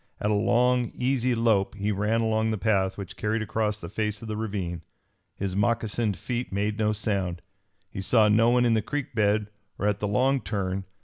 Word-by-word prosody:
At 105 - 0
a - - +3
long, 120 +3 +2
easy 125 -1 +1
lope 110 -4 +2
he 105 +1 -1
ran 105 +3 +1
along 110 0 +1
the 110 - -1
path 95 -3 +1
which 100 0 -7
carried 110 +1 -1
across 105 0 -1
the 85 - -7
face 105 +2 -2
of - - -7
the 110 - -3
ravine. 100 -6 -3 0.5
His 95 -1 -3
moccasined 110 -1 0
feet 125 0 -4
made 105 +2 -1
no 105 -1 +2
sound. 100 -5 -2 0.5
He 95 - -5
saw 110 +2 +4
no 115 +2 +4
one 125 0 +3
in 120 - +3
the 110 - +2
creek 145 +5 -4
bed 105 -1 +1 0.3
or - - -2
at 105 -1 +1
the 105 - -1
long 130 +6 +2
turn. 95 -2 -3
105 Hz, 200 wpm, -26 LUFS, 100-115 Hz, 0.5 s, saw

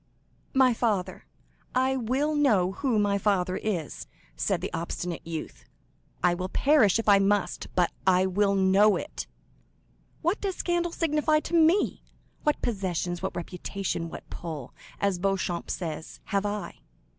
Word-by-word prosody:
50157m - - -37
"My 260 -2 +5
father—I 235 +4 -2
will 265 +5 0
know 215 -11 +3
who 245 +2 0
my 200 -1 +2
father 185 -3 +1
is," 180 -8 -3 0.3
said - - 0
the - - -5
obstinate 170 +1 -3
youth; 155 - -6 0.6
"I 180 - +4
will 185 +1 -3
perish 260 -8 +4
if 225 - -3
I 200 -1 +7
must, 200 0 +1
but 180 -2 +3 0.2
I 185 0 +5
will 200 +1 +2
know 195 +2 +5
it. - - -5 1.0
What 345 +6 +1
does 390 -3 -2
scandal 345 -1 0
signify 305 -2 +2
to - - -8
me? 335 +4 +3 0.4
What 300 - 0
possessions, 180 -5 -2
what - - -3
reputation, 175 0 -4
what - - -9
'pull,' 155 -7 -6 0.3
as 200 -3 +1
Beauchamp 185 -2 -1
says,—have 180 +4 -3
I? 205 0 -5
200 Hz, 140 wpm, -27 LUFS, 180-260 Hz, 1.0 s, I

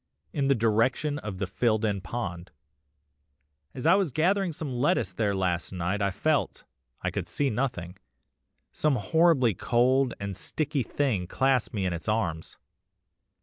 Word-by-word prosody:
in 140 -2 0
the 140 - +4
direction 115 +6 +1
of 105 -6 -6
the 95 - -1
filled 110 +3 +1
in 100 -3 -1
pond. 90 -3 -5 1.3
'As 125 - -6
I 165 - +6
was 190 -6 +2
gathering 185 +6 +1
some 150 -3 -5
lettuce 120 -6 +1
there 100 +1 0
last 90 -3 -1
night 90 +3 -2
I 100 - +2
felt 140 +10 0 0.4
(I - - 0
could - - -4
see 140 -2 0
nothing) 105 -7 -3 0.7
some 150 -3 +1
horribly 130 - +3
cold 125 +6 +2
and 100 -1 -4
sticky 150 - -2
thing 115 -8 -1
clasp 130 +4 +1
me 100 -2 -1
in 90 - 0
its 85 +5 -4
arms. 85 -7 -2
115 Hz, 150 wpm, -27 LUFS, 95-140 Hz, 1.3 s, I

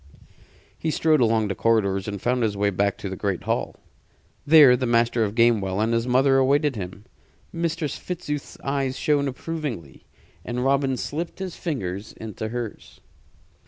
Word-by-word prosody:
He 160 - -1
strode 155 -2 +2
along 110 -2 +2
the 100 - -2
corridors 100 -3 +1
and 100 -1 -4
found 125 +4 0
his 105 -3 0
way 100 0 +1
back 100 +1 0
to - - -6
the 95 - -4
great 95 -1 -2
hall. - - -2 0.7
There 145 -5 +8
the 125 0 -1
Master 115 0 +2
of 105 0 -2
Gamewell 110 -5 +2
and 110 +2 +1
his 115 +1 0
mother 135 +2 +4
awaited 140 +1 +2
him. 100 +1 -7 0.5
Mistress 165 -2 -2
Fitzooth's 155 -5 -5
eyes 135 -1 -1
shone 145 -3 +1
approvingly, 135 - -6 0.4
and 125 +1 -3
Robin 135 -1 +2
slipped 165 +7 -4
his 190 -2 -5
fingers 105 - -4
into 110 0 -6
hers. 115 -1 -6
120 Hz, 160 wpm, -24 LUFS, 105-145 Hz, 0.7 s, There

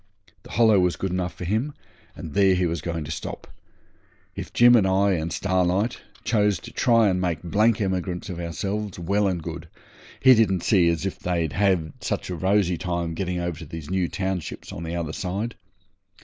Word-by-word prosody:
The - - -15
Hollow 110 -2 +5
was 90 -1 +2
good 95 - -3
enough 90 -2 -2
for 90 - -6
him, 115 - -1 0.4
and 80 - -8
there 95 0 +4
he 90 0 +1
was 85 -1 -2
going 85 -2 -3
to 75 - -6
stop. 75 - -6 0.9
If - - -6
Jim 120 0 +6
and 105 -5 +4
I 100 +1 +3
and 85 -2 -1
Starlight 95 +4 0 0.2
chose 105 -3 +2
to 120 - -10
try 115 -3 +3
and 90 -2 +1
make 85 -3 -1
blank 105 +6 +2
emigrants 95 -3 -2
of 90 -3 -6
ourselves, 100 +4 -3
well 100 +4 +1
and 90 -4 -2
good. 85 0 -6 0.5
He 130 -1 +7
didn't 100 -6 +2
see 90 -5 +4
as 85 0 -1
they'd 85 -5 -2
have 90 -4 +1
such - - -3
a - - -2
rosy 95 -1 +1
time 85 -2 -2
getting 90 +1 -2
over 85 -3 -3
to 85 - -8
these 80 0 -8
new 95 -2 +1
townships 95 -2 -4
on 85 - -6
the 85 0 -4
other 80 -2 -3
side. 100 +7 -3
90 Hz, 190 wpm, -24 LUFS, 85-100 Hz, 0.9 s, He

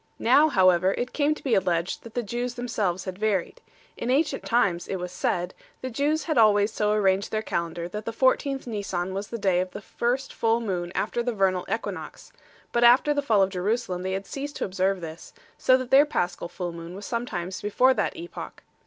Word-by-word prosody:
Now, 310 +2 +5
however, 185 - +4
it 245 +1 -3
came 300 0 +2
to - - -13
be 260 - 0
alleged 175 -2 +1
that 230 - -13
the 245 - 0
Jews 240 +3 -3
themselves 215 -7 -2
had 185 0 -6
varied. 215 - -1 0.3
In 235 - -4
ancient 275 +1 +1
times 195 -8 +1
(it - - -2
was 180 -1 -5
said) 175 0 -1 0.3
the 255 - -4
Jews 295 +6 0
had 310 -6 +1
always 210 -1 +4
so 210 0 +1
arranged 195 -1 +2
their 215 0 -2
calendar 170 -2 -3
that 210 +3 -6
the 230 - -2
14th 270 +3 +1
Nisan 190 -5 -3
was 200 +1 -4
the 235 - -5
day 190 -4 +2
of 185 0 -1
the - - -5
first 245 +6 -2
full 225 0 +1
moon 180 -6 -3
after 240 +3 -1
the 240 0 -1
vernal 190 -3 +1
equinox; - - -5 0.4
but 240 - +2
after 250 +5 +6
the 290 - 0
fall 220 -8 +3
of 190 - 0
Jerusalem 190 0 -1
they 190 +1 -2
had 195 +1 -3
ceased 285 +6 -6
to - - -2
observe 190 0 0
this, 165 0 -9 0.3
so 255 - +5
that 255 -1 -6
their 280 +3 +7
Paschal 175 -11 -2
full 175 0 -4
moon 170 +1 -8
was 200 +1 -8
sometimes 190 -7 -4
before 250 +6 +3
that - - -1
epoch*. 345 +2 -8
210 Hz, 210 wpm, -26 LUFS, 185-245 Hz, 0.4 s, their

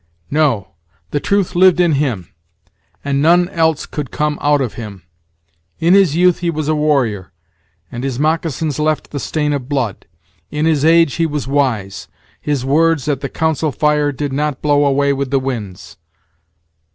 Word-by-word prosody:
No; 135 -11 +1 0.4
the 145 - 0
truth 200 +3 0
lived 180 0 +4
in 175 -2 +3
him, 130 - -2 0.7
and 140 0 0
none 175 +3 +4
else 160 -4 0
could 145 -5 -6
come 150 -1 -2
out 145 0 +3
of 130 -5 -2
him. 105 -6 -9 0.7
In 170 +2 +3
his 190 -6 +4
youth 180 0 +3
he 175 - -1
was 155 -2 -3
a 155 - +2
warrior, 135 -11 0 0.6
and 120 +1 -6
his 135 -3 -3
moccasins 155 -1 -1
left 155 0 -1
the 145 - -4
stain 150 +1 -1
of 135 -2 -4
blood. 130 -9 -2 0.4
In 150 +1 -2
his 155 -3 +2
age 165 -2 +4
he 165 -1 +1
was 150 -3 -4
wise; 115 -9 -1 0.3
his 145 -4 -2
words 160 +1 +2
at 140 -3 -1
the 140 - -4
council 160 -1 -1
fire 150 +1 +1
did 140 0 -4
not 150 -1 -1
blow 145 -1 +3
away 140 0 +2
with 140 -1 -3
the 135 0 +1
winds." 105 -9 -6
145 Hz, 170 wpm, -17 LUFS, 135-160 Hz, 0.7 s, lived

